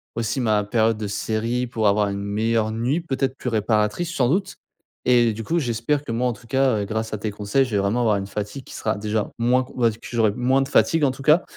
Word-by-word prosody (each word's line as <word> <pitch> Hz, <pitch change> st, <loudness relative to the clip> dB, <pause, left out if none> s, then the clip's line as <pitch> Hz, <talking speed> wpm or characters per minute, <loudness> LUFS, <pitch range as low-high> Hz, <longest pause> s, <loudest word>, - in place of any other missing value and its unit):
aussi, 115 Hz, +3 st, -1 dB
ma 105 Hz, -3 st, +1 dB
période 110 Hz, +1 st, +2 dB
de 105 Hz, -1 st, -4 dB
série 115 Hz, +4 st, -1 dB
pour 110 Hz, -3 st, 0 dB
avoir 105 Hz, 0 st, +2 dB
une 100 Hz, 0 st, -3 dB
meilleure 110 Hz, +2 st, 0 dB
nuit, 120 Hz, +8 st, 0 dB
peut-être, 135 Hz, -5 st, -2 dB
plus -, -, -7 dB
réparatrice, 110 Hz, +9 st, 0 dB
sans 125 Hz, -6 st, +2 dB
doute 190 Hz, +7 st, 0 dB, 0.5 s
et 120 Hz, -2 st, +4 dB
heu, -, -, -1 dB
du 115 Hz, +2 st, -6 dB
coup, 170 Hz, +1 st, +1 dB
j'espère 125 Hz, +2 st, -1 dB
que 130 Hz, -, -6 dB
moi, 120 Hz, +2 st, 0 dB
en 125 Hz, -, 0 dB
tout, 115 Hz, -, -16 dB
cas, 130 Hz, -1 st, +2 dB
heu, -, -, -2 dB
grâce 110 Hz, +2 st, -3 dB
à -, -, -1 dB
tes 105 Hz, +1 st, -3 dB
conseils, 105 Hz, +6 st, +1 dB
je 125 Hz, -, -8 dB
vais 105 Hz, -, +1 dB
vraiment 100 Hz, +5 st, +1 dB
avoir 110 Hz, -3 st, +3 dB
une 95 Hz, 0 st, -4 dB
fatigue 105 Hz, +6 st, -5 dB
qui -, -, -11 dB
sera 110 Hz, -1 st, -1 dB
déjà 105 Hz, 0 st, -2 dB
moins, 125 Hz, +2 st, +3 dB
q 125 Hz, -, -14 dB
on -, -, -5 dB
va 115 Hz, -, +5 dB
dire, 110 Hz, 0 st, -8 dB
que -, -, -14 dB
j'aurai 115 Hz, -3 st, +2 dB
moins 130 Hz, +2 st, +2 dB
de 135 Hz, -, -1 dB
fatigue, 150 Hz, +2 st, +3 dB
en 135 Hz, -, +2 dB
tout 135 Hz, +1 st, -10 dB
cas 155 Hz, +4 st, +5 dB
115 Hz, 270 wpm, -23 LUFS, 105-130 Hz, 0.5 s, va